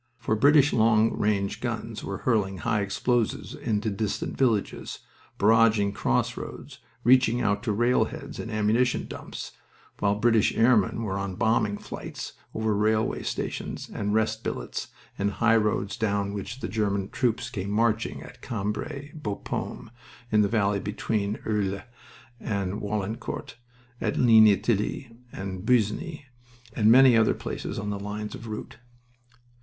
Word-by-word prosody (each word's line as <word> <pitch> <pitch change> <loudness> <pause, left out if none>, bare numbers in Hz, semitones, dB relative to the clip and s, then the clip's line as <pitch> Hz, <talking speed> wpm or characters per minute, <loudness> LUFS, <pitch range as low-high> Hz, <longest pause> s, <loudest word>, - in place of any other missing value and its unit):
For 115 -3 -1
British 145 +4 +5
long 110 -1 +4
range 105 +1 0
guns 115 -2 -4
were 100 - -4
hurling 105 -6 +1
high 105 +3 0
explosives 110 +4 -1
into 110 0 -1
distant 105 0 -2
villages, 115 -6 0 0.4
barraging 110 -1 +4
crossroads, 65 - -2 0.2
reaching 125 -1 +5
out 105 -4 +1
to 115 -2 -1
rail 120 +4 +3
heads - - -8
and 115 - -5
ammunition 110 +4 +1
dumps, - - -8 0.5
while 100 0 +2
British 110 0 +2
airmen 115 -1 +3
were 100 -2 -2
on 100 -1 -3
bombing 105 0 +1
flights - - -7 0.2
over 110 -1 0
railway 110 +1 +1
stations - - -4
and 105 +1 -1
rest 110 0 0
billets - - -4 0.3
and 100 +1 0
highroads 105 -3 +2
down 100 -2 0
which 115 +6 -6
the - - -2
German 100 -1 -1
troops 120 -1 -1
came 100 -5 -4
marching 110 +1 0
at 125 - -13
Cambrai, 125 +7 -4
Bapaume, 110 -5 -5 0.4
in 105 -1 +5
the 105 - +3
valley 100 -2 +1
between 105 0 -2
Irles 100 -3 -1 0.6
and 100 -1 -2
Warlencourt, 105 +2 -4 0.5
at - - -1
Ligny 110 -4 +7
Thilloy, 115 +3 -1 0.5
Busigny, 125 - 0 0.5
and 110 0 +4
many 130 0 +8
other 115 -1 +4
places - - -5
on 105 0 -3
the 100 - -3
lines 105 +1 -5
of 115 - -8
route. 110 -1 -7
110 Hz, 135 wpm, -26 LUFS, 100-115 Hz, 0.6 s, many